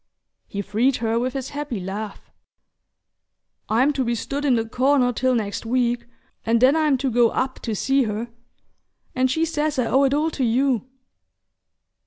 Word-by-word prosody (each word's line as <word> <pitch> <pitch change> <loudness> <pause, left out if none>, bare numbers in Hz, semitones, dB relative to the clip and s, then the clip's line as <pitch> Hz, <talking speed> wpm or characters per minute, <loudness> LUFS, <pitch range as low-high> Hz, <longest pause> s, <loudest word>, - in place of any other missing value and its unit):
He 200 0 -4
freed 230 +7 +1
her 230 0 0
with 255 +1 -2
his 270 -1 -4
happy 290 -6 -4
laugh. 195 +3 -6 1.4
"I'm 255 +7 +3
to 270 - 0
be 235 -1 0
stood 280 +6 -3
in 265 -4 +4
the 225 -1 -1
corner 255 +1 +2
till 255 +2 +1
next 205 -3 -2
week, 240 0 0 0.4
and 230 +1 +2
then 260 +5 +5
I'm 305 -4 +2
to 265 0 -1
go 235 0 +4
up 260 +3 -2
to 225 -3 -3
see 270 +4 +2
her. 215 +2 -3 0.9
And 260 0 +1
she 320 +5 +1
says 305 -2 -1
I 250 - +1
owe 270 +4 +3
it 275 +1 +2
all 310 +2 +1
to 275 - -2
you!" 255 +1 +1
255 Hz, 175 wpm, -23 LUFS, 230-275 Hz, 1.4 s, then